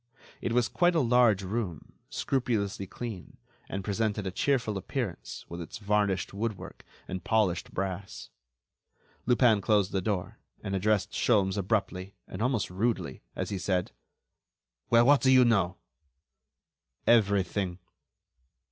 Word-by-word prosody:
It -, -, -2 dB
was 120 Hz, -1 st, +3 dB
quite 175 Hz, 0 st, +2 dB
a -, -, +4 dB
large 120 Hz, -6 st, +4 dB
room, 95 Hz, -5 st, -4 dB, 0.2 s
scrupulously 110 Hz, -7 st, -1 dB
clean, 110 Hz, -3 st, -7 dB, 0.3 s
and 95 Hz, 0 st, -4 dB
presented 105 Hz, 0 st, -1 dB
a 95 Hz, -, -2 dB
cheerful 125 Hz, 0 st, 0 dB
appearance 95 Hz, -, -4 dB
with 85 Hz, +1 st, -7 dB
its 85 Hz, -, -7 dB
varnished 100 Hz, -3 st, 0 dB
woodwork 105 Hz, 0 st, -5 dB, 0.2 s
and 95 Hz, 0 st, -5 dB
polished 105 Hz, -6 st, +1 dB
brass. 95 Hz, 0 st, -5 dB, 1.0 s
Lupin 120 Hz, -4 st, +4 dB
closed 100 Hz, -1 st, +2 dB
the 95 Hz, -, 0 dB
door 95 Hz, -2 st, -3 dB, 0.2 s
and 95 Hz, -, -2 dB
addressed 105 Hz, +1 st, +1 dB
Sholmes 100 Hz, -5 st, +2 dB
abruptly, 100 Hz, -1 st, -1 dB
and 95 Hz, -, -7 dB
almost 120 Hz, -6 st, 0 dB
rudely, 110 Hz, +5 st, -1 dB
as -, -, -3 dB
he 100 Hz, -, -2 dB
said: 90 Hz, -1 st, -1 dB, 1.0 s
"Well, 115 Hz, 0 st, +6 dB
what 145 Hz, +1 st, +6 dB
do 130 Hz, -, +3 dB
you 130 Hz, -1 st, +7 dB
know?" 95 Hz, -6 st, +2 dB, 1.3 s
"Everything." 100 Hz, -4 st, +2 dB
100 Hz, 130 wpm, -29 LUFS, 95-115 Hz, 1.3 s, you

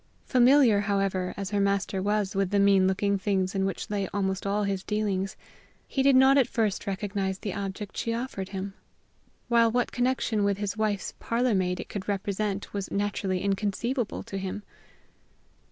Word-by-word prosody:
Familiar, 250 Hz, -3 st, +5 dB
however, 195 Hz, -2 st, 0 dB
as 195 Hz, 0 st, -4 dB
her 205 Hz, -, +1 dB
master 200 Hz, -1 st, 0 dB
was 205 Hz, 0 st, 0 dB
with 195 Hz, -2 st, 0 dB
the 205 Hz, -, +1 dB
mean 200 Hz, -1 st, +5 dB
looking 200 Hz, +1 st, +1 dB
things 190 Hz, -1 st, 0 dB
in 195 Hz, -1 st, 0 dB
which 195 Hz, -, -3 dB
lay 200 Hz, -2 st, -1 dB
almost 190 Hz, 0 st, -2 dB
all 205 Hz, +1 st, +1 dB
his 195 Hz, -1 st, -2 dB
dealings, 200 Hz, -2 st, -1 dB, 0.5 s
he 270 Hz, -, -1 dB
did 275 Hz, 0 st, +5 dB
not 265 Hz, +2 st, +6 dB
at 260 Hz, -, +3 dB
first 215 Hz, -4 st, -1 dB
recognize 195 Hz, -1 st, -2 dB
the 200 Hz, -1 st, -4 dB
object 200 Hz, +1 st, -5 dB
she 230 Hz, -, -1 dB
offered 230 Hz, -5 st, -4 dB
him; 195 Hz, 0 st, -5 dB, 0.7 s
while 235 Hz, -1 st, +4 dB
what 245 Hz, +1 st, 0 dB
connection 245 Hz, -4 st, 0 dB
with 200 Hz, -1 st, +1 dB
his 205 Hz, 0 st, -3 dB
wife's 215 Hz, -2 st, -1 dB
parlor 240 Hz, +1 st, +1 dB
maid 180 Hz, -2 st, 0 dB
it -, -, -6 dB
could 200 Hz, -2 st, -6 dB
represent 200 Hz, 0 st, -2 dB
was 200 Hz, -1 st, -3 dB
naturally 200 Hz, -2 st, -1 dB
inconceivable 210 Hz, +5 st, -1 dB
to 195 Hz, -, -5 dB
him. 195 Hz, +2 st, -5 dB
200 Hz, 170 wpm, -27 LUFS, 195-215 Hz, 0.7 s, not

